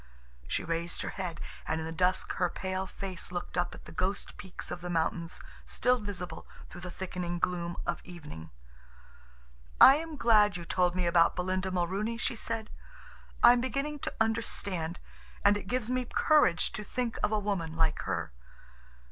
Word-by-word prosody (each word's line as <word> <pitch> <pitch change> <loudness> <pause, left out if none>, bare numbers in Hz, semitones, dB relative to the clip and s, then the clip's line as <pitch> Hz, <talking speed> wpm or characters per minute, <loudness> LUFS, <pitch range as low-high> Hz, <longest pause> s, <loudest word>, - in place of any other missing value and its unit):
She - - -1
raised 170 +1 -2
her - - -3
head, 180 -4 -4 0.3
and 160 - 0
in 160 - -3
the 160 - -4
dusk 180 +3 +1
her 180 -1 +2
pale 190 +1 -3
face 185 -2 -6
looked 175 -1 -4
up 175 -1 0
at - - -13
the - - -9
ghost 185 +4 -2
peaks 190 -2 -8
of 175 0 -4
the 180 - -5
mountains 165 0 -1 0.2
still 250 0 +2
visible 200 -4 -6 0.2
through 175 - -10
the 180 - -5
thickening 175 -1 -4
gloom 175 0 -1
of 175 - -2
evening. 150 - -9 1.3
"I 270 - +10
am 320 -1 -5
glad 210 -6 +5
you 170 - -7
told 180 0 +2
me 180 -1 +1
about 170 -1 +4
Belinda 185 +1 -1
Mulrooney," 190 +5 -1
she 235 - 0
said. 225 -1 -3 0.7
"I 240 - +10
am 245 - +1
beginning 275 +4 -2
to - - -3
understand, 200 -6 0 0.5
and 205 0 +7
it 205 - -5
gives 250 0 -1
me 255 0 0
courage 245 - +3
to 210 - -5
think 235 +2 -2
of - - +2
a 215 - +3
woman 195 -6 -2
like 160 -1 +2
her. 85 -4 -2
185 Hz, 175 wpm, -30 LUFS, 170-220 Hz, 1.3 s, I